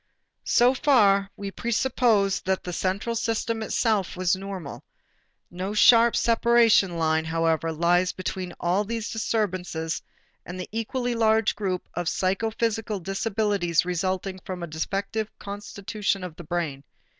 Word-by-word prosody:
So 245 +2 +5
far 205 -8 +4
we 200 -1 -5
presupposed 230 -4 +1
that 190 0 0
the 180 - -5
central 195 +6 -1
system 225 0 -1
itself 215 -4 0
was 185 0 +2
normal. 190 -6 -7 0.7
No 185 +4 -4
sharp 230 +2 +6
separation 230 -6 +4
line, 160 -1 +1
however, 165 0 0
lies 175 +3 +2
between 185 -1 -5
all 180 +4 +1
these 225 +1 -4
disturbances 185 -7 -2 0.4
and 180 +1 -8
the 180 - -5
equally 240 +3 -2
large 220 -2 +2
group 185 -3 -3
of 175 -1 -1
psychophysical 220 +2 -1
disabilities 195 -3 0
resulting 185 +1 -2
from 180 -1 -6
a - - -1
defective 195 +7 -3
constitution 200 -1 -4
of 180 -3 -7
the 175 - -10
brain. 155 -5 -3
195 Hz, 130 wpm, -25 LUFS, 175-225 Hz, 0.7 s, sharp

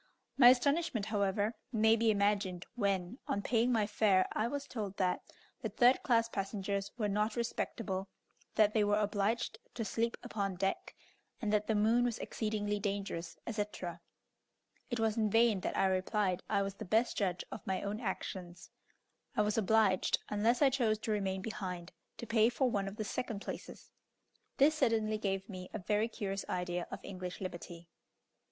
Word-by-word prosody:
My 245 -2 +9
astonishment, 270 -2 +2
however, 205 0 0 0.2
may 220 -1 +4
be 230 0 +2
imagined 200 -3 +1
when, 200 0 -1
on 200 - -1
paying 240 +1 +2
my 220 -3 +3
fare, 205 -3 +3
I 215 - 0
was 285 +2 -3
told 205 -5 -5
that 180 -1 +1 0.4
the - - -2
third 250 +1 +4
class 230 -3 +3
passengers 200 -1 -3
were 215 -4 0
not 210 +2 0
respectable, 210 -4 -2 0.5
that 215 -1 +4
they 215 - +3
were 205 0 +3
obliged 210 +2 0 0.2
to 225 - -2
sleep 230 +2 -1
upon 195 -3 -2
deck, 195 +1 -2 0.4
and 215 -3 -1
that 210 0 +2
the 220 - +2
moon 225 +4 +4
was 240 -2 0
exceedingly 210 -2 -2
dangerous, 195 -4 -3
etc. 205 -6 -4 0.9
It 240 -2 -2
was 220 -1 +1
in 215 -2 +2
vain 225 -1 +4
that - - -3
I - - +4
replied 190 0 +1
I 200 -2 +2
was 195 0 -3
the 210 - -8
best 220 +5 +2
judge 185 -4 0
of - - -6
my 190 -1 -1
own 205 +2 -3
actions; 180 -5 -5 0.7
I 210 - +5
was 210 0 0
obliged, 215 -3 +3
unless 225 +6 +2
I 275 - +5
chose 235 -5 +2
to 220 - -3
remain 190 -2 -1
behind, 185 -5 -5 0.3
to - - -6
pay 225 0 +4
for 250 +1 +1
one 200 -2 0
of 195 - -6
the 215 - -3
second 210 0 -3
places. - - -8 0.7
This 290 +3 +6
certainly 225 -7 +1
gave 195 -2 -2
me 185 -3 -8
a - - -3
very 210 +3 +1
curious 195 -3 -4
idea 180 -1 -2
of - - -6
English 185 -2 -6
liberty. 175 -2 -7
210 Hz, 175 wpm, -34 LUFS, 195-225 Hz, 0.9 s, My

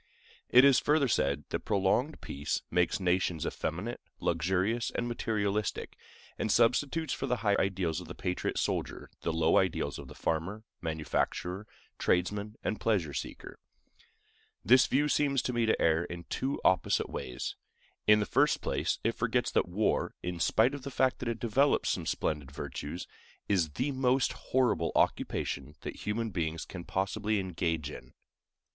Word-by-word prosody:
It 125 +2 +8
is 140 -2 +6
further 150 -2 +3
said 70 - +1
that - - -1
prolonged 105 +8 +1
peace 70 +2 -3
makes 90 0 +2
nations 90 -3 +1
effeminate, - - -3 0.2
luxurious, 95 +6 0
and 120 - -2
materialistic, 105 -3 -1 0.4
and 110 - 0
substitutes 140 +8 +2
for 135 - -3
the 125 - +1
high 100 -1 +4
ideals 90 -3 0
of 90 - -10
the 90 - -8
patriot 90 -1 -2
soldier - - -2
the 85 - -1
low 80 0 +3
ideals 95 -3 -1
of - - -9
the - - -11
farmer, 90 +7 -2 0.2
manufacturer, 85 +4 -2 0.3
tradesman, 100 +4 0
and 110 - -2
pleasure 95 -10 +1
seeker. - - -6 1.1
This 125 +6 +6
view 145 +3 +2
seems 140 -2 +2
to 125 - -2
me 120 -1 +1
to 110 - +2
err 80 +1 +3
in 85 -1 -7
two 135 +2 -1
opposite 95 -1 +2
ways. 60 - -4 0.5
In 105 0 +7
the 105 - +1
first - - +3
place, - - -1
it - - +2
forgets - - 0
that - - +1
war, 105 +5 0
in 90 -1 -3
spite 110 +9 +3
of 145 - -5
the 140 - -6
fact 130 -1 +1
that 120 - -2
it 115 - -3
develops 135 +5 +2
some 85 -3 -3
splendid 75 -3 -1
virtues, 70 +3 -6 0.4
is 90 -6 +2
the 135 +4 -1
most 130 -1 +2
horrible 125 -10 +1
occupation 70 +2 0
that - - -6
human 110 +1 -1
beings 80 -2 -2
can 90 -2 -8
possibly 100 +2 0
engage 80 -5 -2
in. - - -11
100 Hz, 160 wpm, -31 LUFS, 85-120 Hz, 1.1 s, It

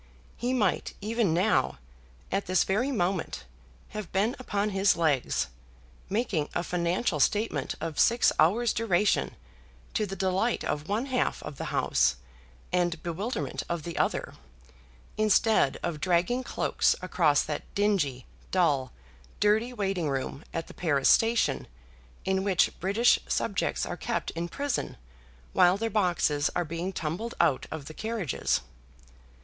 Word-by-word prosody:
He 245 +1 -2
might 215 -8 0
even 220 -2 0
now, 170 - +2 0.5
at 195 0 -1
this 185 -2 +3
very 225 +9 0
moment, 180 - -1 0.5
have 210 -4 -6
been 210 +7 +1
upon 210 -4 -1
his 195 0 +3
legs, 150 -6 +1 0.6
making 200 -8 0
a 170 - 0
financial 175 0 0
statement 205 -5 +1
of 160 -1 -4
six 235 0 +4
hours' 215 +9 +4
duration, 210 -3 +1 0.6
to 215 -2 0
the 195 - -5
delight 190 +5 0
of 150 +3 -3
one 215 +5 0
half 255 -2 -1
of 150 -2 -7
the - - -4
House, 65 - +2 0.6
and 175 -2 0
bewilderment 170 - -3
of 170 -2 -2
the 170 +1 -6
other, - - 0 0.8
instead 215 -7 +3
of 155 -3 -3
dragging 185 +8 +1
cloaks - - +1
across 160 -5 +3
that 150 -1 -3
dingy, 175 - +1 0.2
dull, 145 -8 +2 0.5
dirty 215 +4 +3
waiting 195 -8 -1
room 135 +2 -3
at 165 0 -3
the - - -12
Paris 145 -6 +2
Station, 230 +1 +3 0.6
in 190 0 +1
which 190 -3 +3
British 205 +7 +3
subjects - - 0
are - - -5
kept - - -2
in 170 +1 -3
prison 285 +8 -3 0.6
while 180 +2 +5
their 225 +1 -2
boxes 170 -7 +2
are 175 - +1
being 170 +4 -3
tumbled 180 +7 -4
out 135 - +2
of 155 -3 -6
the 155 - -8
carriages. 215 - -1
185 Hz, 140 wpm, -28 LUFS, 160-215 Hz, 0.8 s, while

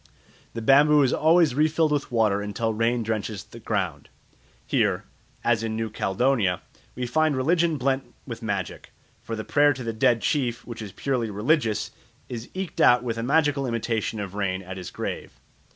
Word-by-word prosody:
The 115 - -4
bamboo 145 +4 +6
is 130 - +2
always 160 -2 +4
refilled 155 +2 +2
with 145 -3 -1
water 110 -4 +2
until 110 +2 -2
rain 115 +2 +1
drenches 110 -3 -3
the 115 - -13
ground. 95 -11 -3 0.6
Here, - - +1 0.4
as 120 -2 +2
in 110 -1 -2
New 110 -1 -3
Caledonia, 100 -3 +1 0.3
we 125 - -3
find 155 +3 +1
religion 165 +3 +2
blent 135 0 -1
with 115 -2 -7
magic, 100 -5 -4 0.3
for 115 - -5
the 110 - -5
prayer 145 0 +4
to 130 0 -7
the 115 -1 -3
dead 115 +1 +2
chief, 125 -5 0
which 120 -2 -7
is 105 -3 -7
purely 125 0 -2
religious, 110 - 0 0.4
is 120 -1 -6
eked 190 -2 -3
out 125 0 +6
with 115 -2 -3
a - - -1
magical 145 +1 +2
imitation 115 -2 -2
of 100 -2 -5
rain 95 -2 -2
at 95 +1 -8
his 90 -2 -6
grave. - - -6
115 Hz, 175 wpm, -25 LUFS, 110-140 Hz, 0.6 s, bamboo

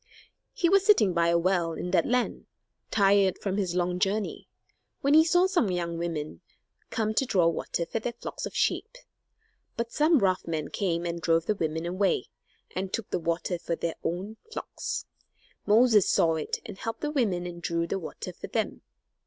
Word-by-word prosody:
He 355 - +1
was 390 +2 +5
sitting 395 - +5
by 170 0 +2
a 170 0 +4
well, 170 -1 +1
in 180 +2 -4
that - - +3
land, 250 0 0 0.4
tired 200 -2 +4
from 195 -1 -2
his 185 -4 -1
long 180 0 0
journey, 200 +2 -1 0.5
when 280 +1 +3
he 315 +1 +8
saw 350 +2 +4
some 360 - +2
young 170 -2 -2
women 155 - -4 0.5
come 220 -1 -1
to 245 - +2
draw 185 -9 +3
water 170 0 -1
for 225 - -3
their 235 +2 -3
flocks 235 - -6
of - - -11
sheep. - - 0 0.8
But 235 0 -2
some 310 +2 +4
rough 185 -7 +1
men 155 -3 -2
came, 175 -3 -1
and 170 0 -3
drove 165 0 +2
the 215 - +2
women 160 -3 -2
away, 185 +3 0 0.5
and 185 0 -3
took 230 - -4
the - - 0
water 170 +1 -1
for 170 - -2
their 165 0 -2
own 190 +6 -3
flocks. - - -4 0.6
Moses 220 -1 +5
saw 165 -1 +3
it, 160 -1 -2
and 190 - -8
helped 225 - -4
the 300 - -1
women 205 -11 0
and 175 -1 -7
drew 170 -1 -1
the 195 - -2
water 165 - -7
for - - -8
them. - - -2
185 Hz, 185 wpm, -28 LUFS, 170-225 Hz, 0.8 s, he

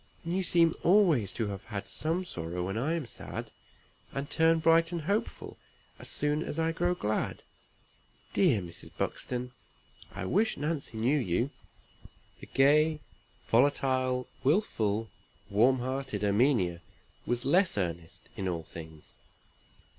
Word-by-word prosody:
And 170 +2 -1
you 190 - +1
seem 170 -2 +3
always 170 - +4
to 115 - -1
have 100 -1 -6
had 105 -3 -5
some 165 +4 -1
sorrow 85 - -4
when 95 +2 -3
I 135 +8 0
am 165 -5 -3
sad, - - -7 0.6
and 140 +1 -4
turn 165 +2 +3
bright 165 +1 +4
and 170 -2 -2
hopeful 200 +8 -3 0.4
as - - -7
soon 150 +1 +1
as 160 - -4
I 165 0 +1
grow 175 +2 0
glad. 110 -9 -2 0.9
Dear 140 - +3
Mrs. 85 -1 -9
Buxton! 125 0 -3 0.6
I 90 - -5
wish 210 - +1
Nancy 145 -6 -3
knew 130 +7 +2
you." 120 +4 0 0.9
The - - -11
gay, 150 +3 +4 0.5
volatile, 130 0 +2 0.2
willful, 115 - +1 0.4
warm 120 +6 +4
hearted 130 0 -3
Erminia 100 -5 +2 0.5
was 120 0 -1
less 180 - +3
earnest 85 -3 -4
in 95 - -3
all 85 -3 -2
things. 80 -1 -11
130 Hz, 135 wpm, -30 LUFS, 105-165 Hz, 0.9 s, always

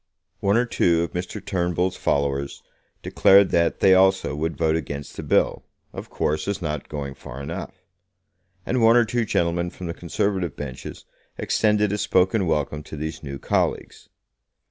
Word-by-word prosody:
One 100 +1 +2
or 120 - +2
two 85 -7 +2
of 85 - -4
Mr. 90 0 -5
Turnbull's 90 0 -1
followers 70 0 -1 0.4
declared 100 0 +5
that 85 0 +1
they 95 - +6
also 95 -4 +3
would 80 +2 -3
vote 80 0 +2
against 70 -3 -5
the - - -5
bill, - - +1 0.3
of - - -8
course, 75 +2 -1
as 100 -1 -1
not 75 -4 -4
going 70 -2 -5
far 65 -1 -10
enough; 85 +5 -7 0.8
and 125 -1 0
one 115 +1 +6
or 120 - +5
two 120 +1 -1
gentlemen 85 -2 0
from 90 0 -9
the 85 - -3
Conservative 90 -1 -2
benches 65 -4 -8 0.3
extended 105 -2 +1
a 105 - -2
spoken 95 +1 +2
welcome 75 -1 -1
to 75 - -9
these 80 +2 -5
new 70 -2 -6
colleagues. - - -2
85 Hz, 165 wpm, -23 LUFS, 75-95 Hz, 0.8 s, they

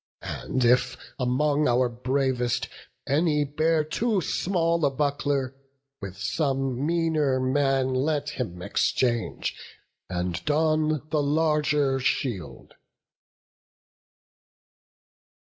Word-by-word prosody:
And 130 -2 -2
if, 125 +1 +3 0.2
among 145 +4 +1
our 125 +1 +3
bravest, 125 0 -1 0.4
any 150 0 +2
bear 155 +2 +1
Too 215 +7 0
small 170 -2 0
a 145 - +4
buckler, 140 -1 -1 0.5
with 95 -2 -7
some 135 - -1
meaner 160 -5 +1
man 130 0 +1
Let 145 +2 0
him 90 -11 -5
exchange, 120 +3 0 0.5
and 90 -1 -3
don 155 -1 +1
the 150 - +2
larger 150 -2 +1
shield." 100 - -3
140 Hz, 90 wpm, -26 LUFS, 125-155 Hz, 0.5 s, a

